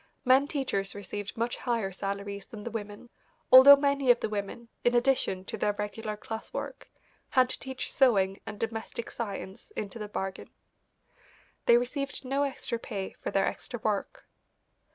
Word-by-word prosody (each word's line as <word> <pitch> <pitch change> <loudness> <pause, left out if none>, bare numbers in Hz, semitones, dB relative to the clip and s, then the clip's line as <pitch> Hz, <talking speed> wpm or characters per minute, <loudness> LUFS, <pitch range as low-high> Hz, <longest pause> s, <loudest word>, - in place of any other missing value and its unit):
Men 260 +3 +5
teachers 260 -10 -2
received 205 +1 -6
much 235 +1 -1
higher 230 -6 -1
salaries 200 +1 -5
than 210 -2 -9
the 235 - -5
women, 210 +1 -6 0.4
although 260 +2 +12
many 280 -2 +1
of 245 -1 +7
the - - -2
women, 210 +3 -4 0.2
in 240 0 +3
addition 240 -7 +2
to - - -5
their 205 - +1
regular 210 +1 -4
class 220 +1 -7
work, - - -6 0.4
had 255 -2 +4
to - - -5
teach 265 -1 -5
sewing 195 -7 +3
and 205 0 -7
domestic 225 0 -4
science 200 -4 -6
into 210 +2 -5
the 210 - -4
bargain. 190 -2 -4 1.2
They 235 - +8
received 275 +3 -2
no 275 +2 0
extra 265 -4 -2
pay 195 -5 -5
for - - -3
their 195 - +2
extra 245 - -4
work. 215 - -2
225 Hz, 160 wpm, -29 LUFS, 200-255 Hz, 1.2 s, although